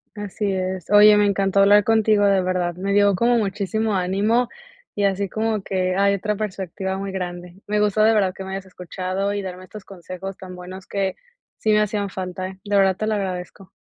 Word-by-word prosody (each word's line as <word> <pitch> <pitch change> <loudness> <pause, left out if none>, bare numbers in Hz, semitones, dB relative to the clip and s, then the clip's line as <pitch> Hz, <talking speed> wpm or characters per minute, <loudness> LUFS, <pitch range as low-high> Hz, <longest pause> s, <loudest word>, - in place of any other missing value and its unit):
Así 205 0 -3
es, 185 -2 -3
oye, 210 0 +8
me 210 - +4
encantó 195 -1 +1
hablar 205 +1 +6
contigo, 220 -1 +3
de 195 -1 +3
verdad, 180 -1 -1
me 195 +2 -2
dio 205 -1 +4
como 235 +6 +2
muchísimo 215 +1 -1
ánimo, 200 +7 +1 0.5
y 205 - -1
así 200 0 +1
como 220 +1 -1
que 185 -1 -1
hay 200 0 +3
otra 210 +2 -2
perspectiva 190 -2 -4
muy 195 0 -4
grande, 180 0 -6
me 210 0 +1
gustó, 210 0 +2
de 220 +1 +5
verdad, 195 -4 +2
que 190 - -8
me 190 - -7
hayas 195 0 -5
escuchado 185 +2 -4
y 205 - -2
darme 185 -1 -7
estos 210 +2 -11
consejos 185 0 -8
tan 185 -1 -10
buenos 185 +1 -10
que, 195 -2 -2 0.4
sí 220 - 0
me 210 - +4
hacían 205 -1 -1
falta, 185 -1 -5
eh, 190 0 -11
de 205 -1 -2
verdad 195 -1 +4
te 215 - -3
lo 220 - +1
agradezco. 190 -1 -5
195 Hz, 210 wpm, -22 LUFS, 185-210 Hz, 0.5 s, oye